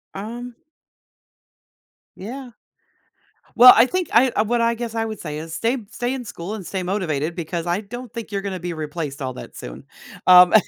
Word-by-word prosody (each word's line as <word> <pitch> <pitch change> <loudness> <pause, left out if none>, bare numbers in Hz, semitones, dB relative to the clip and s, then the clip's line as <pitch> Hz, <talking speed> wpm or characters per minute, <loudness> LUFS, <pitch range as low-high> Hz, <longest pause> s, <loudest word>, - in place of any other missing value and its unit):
Um 235 +4 -6 1.6
Yeah. 245 +4 -8 1.0
Well, 250 +1 +11
I 230 - +7
think, 365 +5 -2
I 250 +3 +5
uh, 215 - +1
what 235 +2 0
I 230 0 +3
guess 230 -1 -5
I 225 0 0
would 220 -1 -6
say, 150 -2 -5
is 160 +1 -7
stay 230 +10 0
stay 245 +2 -2
in 250 -3 -5
school, 195 +2 -6
and 195 - -8
stay 190 +1 -3
motivated, 170 -5 -2
because 170 0 -4
I 175 +4 0
don't 240 +3 -9
think 230 -2 -7
you're 200 -1 -2
gonna 195 -2 -4
be 175 -1 -4
replaced 150 -2 -5
all 130 -1 -3
that - - -10
soon. - - -9 0.4
Um, 180 -1 +8
205 Hz, 185 wpm, -22 LUFS, 170-235 Hz, 1.6 s, Well